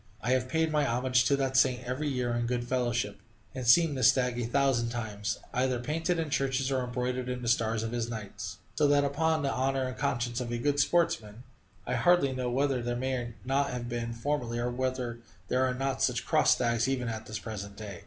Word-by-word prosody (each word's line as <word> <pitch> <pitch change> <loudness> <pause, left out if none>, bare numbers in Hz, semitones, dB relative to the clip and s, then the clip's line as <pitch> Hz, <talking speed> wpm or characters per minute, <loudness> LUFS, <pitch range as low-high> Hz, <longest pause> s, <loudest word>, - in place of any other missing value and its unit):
I 125 - -1
have 130 0 +1
paid 160 +2 +1
my 150 -1 +2
homage 125 -1 +2
to 140 - +4
that 135 -1 -1
saint 130 -1 +3
every 130 +5 -2
year 125 -3 -1
in 120 0 -1
good 120 0 -2
fellowship, 120 -4 -1 0.3
and 130 -2 -4
seen 165 +5 +6
this 130 -3 +4
stag 125 -2 +1
a 115 - -2
thousand 130 -2 +2
times, 110 -3 -3 0.2
either 130 0 +1
painted 165 +7 -1
in 160 -3 -2
churches 135 0 0
or 130 -1 +1
embroidered 125 +1 -2
in 125 0 -4
the - - -3
stars 115 -1 +1
of 115 - -3
his 120 -1 -2
knights; 100 -3 -6 0.2
so 150 - +3
that, 145 0 +4
upon 155 +2 +1
the 135 - +1
honor 135 +1 0
and 130 0 -4
conscience 120 -3 -1
of 120 -1 -4
a 120 - -1
good 145 +4 0
sportsman, 120 -9 +1 0.4
I 125 - -2
hardly 140 +2 +3
know 130 -1 -2
whether 135 0 +1
there 120 0 -2
may 125 -2 -2
not 135 +2 +1
have 125 -1 -4
been 120 -1 -3
formerly, 120 -1 -2
or 120 +1 -1
whether 125 -1 -2 0.3
there 130 +1 +2
are 125 - 0
not 135 +1 -2
such - - +1
crossed - - +4
stags 115 -1 +1
even 130 -2 -1
at 110 -1 -5
this 110 - -4
present 100 -3 -7
day. 100 -5 -7
125 Hz, 220 wpm, -29 LUFS, 120-135 Hz, 0.4 s, seen